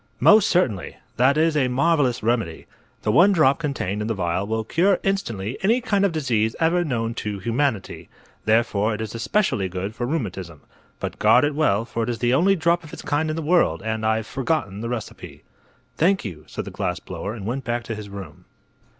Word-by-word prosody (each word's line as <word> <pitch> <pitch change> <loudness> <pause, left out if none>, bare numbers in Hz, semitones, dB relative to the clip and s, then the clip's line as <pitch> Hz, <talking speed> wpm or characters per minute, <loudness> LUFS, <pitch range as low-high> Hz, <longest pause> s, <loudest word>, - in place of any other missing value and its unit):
"Most 210 -1 +6
certainly. 125 - 0 0.2
That 130 +4 +4
is 160 0 +2
a 135 -4 +2
marvelous 130 -2 +1
remedy. 110 -8 -1 0.4
The 105 - +1
one 175 - +6
drop 155 -7 +3
contained 120 - -2
in 105 - -2
the 115 - -1
vial 90 +1 -1
will 110 +1 -1
cure 180 - +2
instantly 120 - -2
any 225 +6 +3
kind 205 -5 0
of 200 - +3
disease 120 -8 0
ever 170 +2 +2
known 115 -7 -2
to 105 -1 -3
humanity. 115 +1 -2 0.4
Therefore 110 -1 +2
it - - -8
is 110 -2 -5
especially 120 - 0
good 95 +3 -4
for 120 +1 -3
rheumatism. 95 - -4 0.4
But - - -5
guard - - +5
it 145 0 +1
well, 115 -8 +1
for 115 0 -4
it 115 - -1
is 120 - -2
the 120 +1 +1
only 185 +8 +4
drop 170 0 +1
of 155 - -13
its - - -8
kind 150 +2 0
in 155 - -2
the 165 - -3
world, 150 - +2
and 110 0 -2
I've 110 0 +1
forgotten 125 -7 -2
the 115 - -4
recipe." 120 -3 -7 0.5
"Thank 190 +1 +2
you," 80 -7 -7
said - - -6
the - - -7
glass - - -2
blower, 105 +3 -6
and 100 -4 -8
went 130 +5 -3
back 120 0 -2
to 115 - -5
his 105 -1 -8
room. 95 -7 -10
120 Hz, 205 wpm, -23 LUFS, 105-160 Hz, 0.5 s, Most